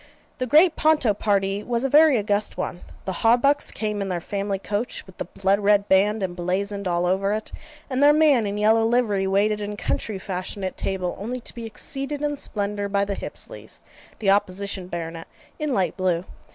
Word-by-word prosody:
The 255 - -1
great 320 +6 +5
Ponto 305 -8 +3
party 200 -1 0
was 235 +2 -1
a - - +2
very 300 -1 +6
august 205 0 -1
one. 175 - -4 0.2
The 190 - -2
Hawbucks 250 +6 +3
came 210 -2 -3
in 195 - -2
their 180 -2 -1
family 200 +3 -3
coach, 205 +4 -4
with 190 - -16
the - - -4
blood 195 +3 0
red 205 0 +3
band 200 +2 +3
emblazoned 190 +3 -2
all 175 0 +1
over 195 +3 +1
it: 215 +1 -4 0.4
and 260 0 -1
their 290 +1 +7
man 295 -7 +4
in 200 +1 -3
yellow 220 +2 +4
livery 225 -4 +1
waited 210 +2 +1
in 205 0 -4
country 210 -1 -2
fashion 190 +1 -5
at 185 - -3
table, 185 -2 -2
only 240 +5 -4
to - - -6
be 230 -1 -6
exceeded 275 +6 -4
in 295 0 0
splendour 205 -3 -2
by 200 0 +1
the 200 - -2
Hipsleys, - - -8 0.4
the 195 -3 +2
opposition 195 -1 0
baronet, 165 -1 -6 0.3
in 300 -2 -1
light 185 -8 0
blue. 180 -2 0
205 Hz, 190 wpm, -24 LUFS, 190-235 Hz, 0.4 s, their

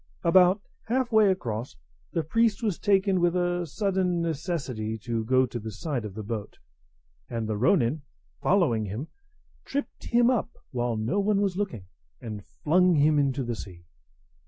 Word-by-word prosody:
About 185 +3 +5 0.2
half 250 +1 0
way 215 -2 +5
across, 120 - -2 0.4
the 165 - -1
priest 225 +6 +1
was 205 -6 0
taken 195 -2 +2
with 175 0 +2
a 175 -1 0
sudden 185 0 0
necessity 140 - -3
to 115 +1 -3
go 130 +3 +3
to 120 -1 -5
the 110 0 -6
side 130 - -3
of 100 -3 -7
the 110 - -5
boat; 105 -1 -5 0.7
and 115 -2 -3
the 110 - -1
ronin, 120 +5 +2 0.4
following 150 - +2
him, 110 +10 -5 0.5
tripped 280 +1 -5
him 240 +1 +4
up 240 -5 -2
while 120 -2 -1
no 115 - 0
one 200 0 +2
was 200 -3 0
looking, 190 - -3 0.3
and 105 -3 -7
flung 180 - +2
him 150 0 +4
into 140 -1 +1
the 120 -1 -3
sea. 90 -5 -10
155 Hz, 160 wpm, -27 LUFS, 115-190 Hz, 0.7 s, About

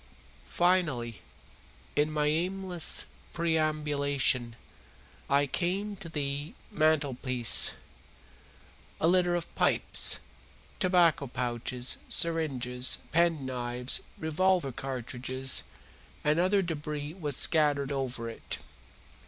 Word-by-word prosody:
Finally, 155 - +1 0.7
in 150 +1 +2
my 150 -1 0
aimless 180 +2 +1 0.3
perambulation, 150 -6 0 0.7
I 140 +1 +3
came 190 +7 -2
to 180 -3 -6
the 145 0 -3 0.2
mantelpiece. 140 - +2 1.3
A 160 - +2
litter 175 0 +3
of 170 -1 -4
pipes, - - +2 0.6
tobacco 175 -7 +3
pouches, 125 0 0
syringes, 130 -7 +1
penknives, 130 -7 0 0.2
revolver 165 -1 +1
cartridges, 130 0 0 0.6
and 150 +2 +2
other 190 +2 +3
debris 150 -2 -4
was 150 -7 -1
scattered 145 -3 +2
over 130 -4 -3
it. 115 - -5
150 Hz, 85 wpm, -29 LUFS, 130-170 Hz, 1.3 s, I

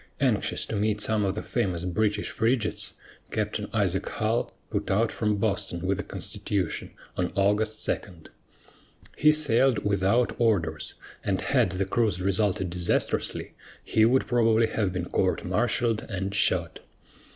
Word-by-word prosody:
Anxious - - +1
to - - -4
meet 105 0 0
some 110 0 +1
of 95 0 0
the 110 - -4
famous 90 -8 -1
British 105 +3 0
frigates, 115 0 -1 0.3
Captain - - -2
Isaac - - 0
Hull - - 0 0.2
put - - -2
out 110 +4 +2
from 105 -2 0
Boston 100 -4 -1
with 95 0 +1
the 100 - -3
Constitution 95 -3 -2 0.3
on 90 -1 0
August 105 +2 +1
2. - - +1 1.2
He 155 - +5
sailed 135 -6 +2
without 100 +4 +2
orders, 80 -9 0 0.3
and 95 -2 0
had 120 -10 +2
the 95 +1 -1
cruise 105 -2 +1
resulted 95 -1 0
disastrously, 90 0 0 0.3
he 110 - +2
would 125 +4 +4
probably 115 -2 +3
have 110 -3 -1
been 90 -1 -3
court - - 0
martialed 120 -1 0
and 95 -1 -3
shot. 100 - +1
105 Hz, 140 wpm, -27 LUFS, 95-115 Hz, 1.2 s, He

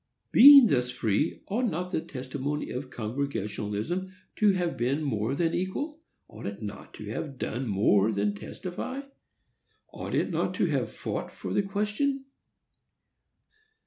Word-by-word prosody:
Being 280 +1 +10
thus 125 - +2
free, 120 +3 -1
ought 235 +6 0
not 180 +1 -3
the 160 - 0
testimony 135 +2 -4
of 130 +1 -5
Congregationalism 120 - -3 0.3
to 215 - +5
have 175 -2 -1
been 135 +6 0
more 115 -2 -1
than 165 +2 +1
equal? 285 - -2 0.3
ought 110 0 -8
it 100 0 -5
not 105 0 -8
to 105 - -8
have 135 +3 -5
done 125 +1 -3
more 100 +1 +3
than 100 0 0
testify?—ought 255 - -8
it - - +1
not - - -1
to - - +2
have - - 0
fought - - -4
for - - -6
the - - +3
question? 210 +8 -1
140 Hz, 140 wpm, -28 LUFS, -, 0.3 s, Being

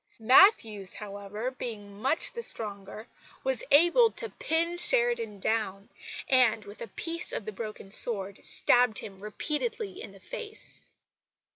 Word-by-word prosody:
Matthews, 225 - +5
however, 205 +3 -6
being 205 -5 -8
much 270 +6 +2
the 470 - -5
stronger, 210 - -3 0.4
was - - -1
able 345 +11 +6
to 460 - -5
pin 335 -7 -1
Sheridan 475 - +2
down, 200 -1 -2 0.4
and 240 -5 +3
with 205 +1 -12
a 235 - -5
piece 330 - -3
of 205 - -4
the 215 - -4
broken 215 -2 -8
sword 200 -3 +2
stabbed 245 -3 +2
him 195 -3 -7
repeatedly 375 - -3
in - - -9
the - - -16
face. 460 -3 -5
230 Hz, 135 wpm, -28 LUFS, -, 0.4 s, able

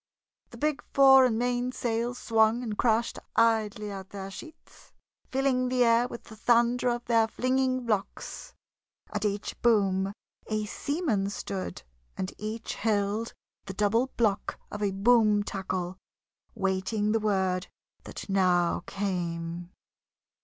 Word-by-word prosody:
The - - -12
big 300 -1 0
fore 270 -1 +8
and 230 -3 +1
main 245 +1 0
sails 240 0 -2
swung 225 +1 +2
and 220 -3 -3
crashed 230 +1 +1 0.2
idly 220 -2 +2
at 195 -1 -7
their 195 -1 -7
sheets, 315 - -13 0.4
filling 260 -1 +1
the 250 -1 +3
air 235 +1 +4
with 235 - -9
the 220 - -12
thunder 240 +2 +3
of 240 0 -2
their 230 -1 +3
flinging 255 +1 0
blocks. 220 - -3 0.6
At 210 +1 -1
each 205 0 -3
boom 195 -4 +3 0.4
a 215 -1 -1
seaman 235 - -1
stood, 195 - -5 0.3
and 185 - -3
each 220 +2 -4
held 215 +1 -1 0.3
the 190 -2 -7
double 210 +5 +2
block 215 -4 0
of 210 - -6
a 205 - +2
boom 210 +1 +4
tackle, 185 -2 -4 0.6
waiting 195 +3 0
the 225 - +2
word 190 -3 0 0.4
that - - -8
now 180 -4 +2
came. 175 -3 -3
215 Hz, 130 wpm, -28 LUFS, 195-240 Hz, 0.6 s, fore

